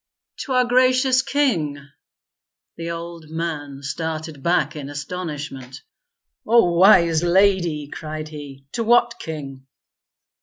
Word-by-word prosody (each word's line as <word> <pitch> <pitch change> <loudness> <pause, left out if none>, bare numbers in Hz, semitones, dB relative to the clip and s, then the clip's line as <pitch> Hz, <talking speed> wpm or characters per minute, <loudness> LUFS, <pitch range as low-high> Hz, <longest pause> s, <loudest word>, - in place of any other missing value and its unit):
"To 270 - -4
our 250 0 +4
gracious 255 +1 +3
king." 205 - 0 1.0
The 165 0 -5
old 170 -1 -7
man 150 -4 -5
started 160 0 -4
back 170 -1 +1
in 145 -2 -6
astonishment. 145 -4 -6 0.6
"O 230 -5 +5
Wise 170 -3 +5
Lady!" 175 -4 +2
cried 155 +1 -7
he. 140 -3 -10
"To 230 - -2
what 235 +1 +3
king." 135 -4 -7
165 Hz, 110 wpm, -22 LUFS, 145-195 Hz, 1.0 s, O